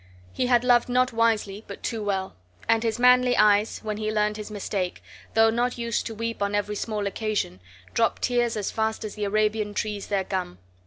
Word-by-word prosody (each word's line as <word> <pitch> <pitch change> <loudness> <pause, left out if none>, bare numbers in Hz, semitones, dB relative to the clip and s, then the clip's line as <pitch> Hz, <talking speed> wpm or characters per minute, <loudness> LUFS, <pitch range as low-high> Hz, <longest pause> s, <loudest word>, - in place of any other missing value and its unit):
He 250 - 0
had 245 -1 +4
loved 245 -1 +4
not 255 +1 +2
wisely, 220 -3 +1
but - - -9
too 225 -3 -2
well; 195 -2 -2 0.3
and 225 0 +3
his 225 0 -1
manly 250 0 +5
eyes 210 0 +3
(when 215 -1 -3
be 215 0 -2
learned 210 0 +1
his 215 0 -7
mistake), 195 -3 -3 0.3
though 225 0 +5
not 245 +2 0
used 235 -1 -1
to 225 - -6
weep 230 0 -4
on 200 0 0
every 205 0 -1
small 210 -1 -2
occasion, 200 - -2 0.3
dropped 230 - +1
tears 240 -2 +1
as 205 - -2
fast 220 0 -1
as 210 - -5
the 210 -1 -3
Arabian 210 0 0
trees 210 -2 -3
their 200 -2 0
gum. 185 - -3
215 Hz, 200 wpm, -25 LUFS, 205-230 Hz, 0.3 s, manly